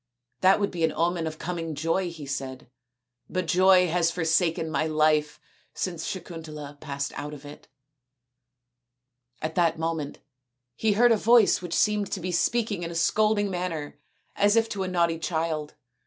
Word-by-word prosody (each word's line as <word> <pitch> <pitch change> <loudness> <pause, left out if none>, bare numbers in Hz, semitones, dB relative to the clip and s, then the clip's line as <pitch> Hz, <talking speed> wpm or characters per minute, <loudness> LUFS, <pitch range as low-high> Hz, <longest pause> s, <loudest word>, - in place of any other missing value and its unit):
That 190 +1 +5
would 200 - 0
be 170 -2 -3
an 160 - +3
omen 170 -1 0
of 155 0 -6
coming 165 -2 -4
joy," 165 +5 0
he 160 -4 -9
said, 135 -1 -5 0.3
" 125 0 -51
but 185 -1 -2
joy 180 +2 +5
has 170 0 +2
forsaken 165 -1 +1
my 155 +2 0
life 155 -1 +2 0.4
since 170 -3 -3
Sakuntala 155 -5 -7
passed 140 -2 -4
out 145 +2 -5
of 145 0 -13
it." 145 - -12 1.8
At 155 0 -2
that 170 -2 +2
moment 160 -3 -3 0.6
he 220 -1 +1
heard 240 +3 +5
a 225 - +5
voice 230 -2 +4
which 175 -2 -4
seemed 210 -2 +1
to - - -2
be 180 +1 -3
speaking 210 +2 0
in 170 - -4
a 170 - -7
scolding 205 +4 +2
manner 165 -6 -4 0.4
as 205 +1 +3
if 225 0 +3
to 200 - -4
a 190 - -1
naughty 170 -2 +1
child. 160 -2 -2
165 Hz, 170 wpm, -26 LUFS, 155-185 Hz, 1.8 s, That